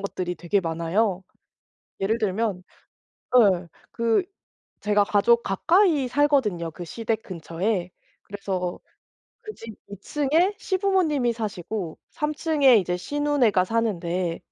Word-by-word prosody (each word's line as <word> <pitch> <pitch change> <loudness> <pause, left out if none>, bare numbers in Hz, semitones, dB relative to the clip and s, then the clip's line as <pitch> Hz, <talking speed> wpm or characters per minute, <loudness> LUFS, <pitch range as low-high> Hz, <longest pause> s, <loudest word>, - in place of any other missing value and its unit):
것들이 185 -2 -3
되게 185 +3 0
많아요. 180 +4 -1 0.8
예를 215 +4 +1
들면 205 -3 -1 0.8
예, 185 -6 +4 0.2
그 230 +7 +1 0.6
제가 210 0 +2
가족 235 +4 +3
가까이 325 - +2
살거든요, 250 - +1
그 175 +2 -8
시댁 225 +4 -3
근처에. 180 +2 -3 0.3
그래서 190 -3 -4 0.6
그 430 - -8
집 225 -1 -9 0.2
2 200 - -8
층에 305 - +1
시부모님이 370 - +1
사시고 205 -5 -5
3 300 0 -2
층에 290 -6 +4
이제 180 -2 0
시누네가 265 -4 +1
사는데. 185 -6 -1
215 Hz, 235 characters per minute, -24 LUFS, 180-275 Hz, 0.8 s, 예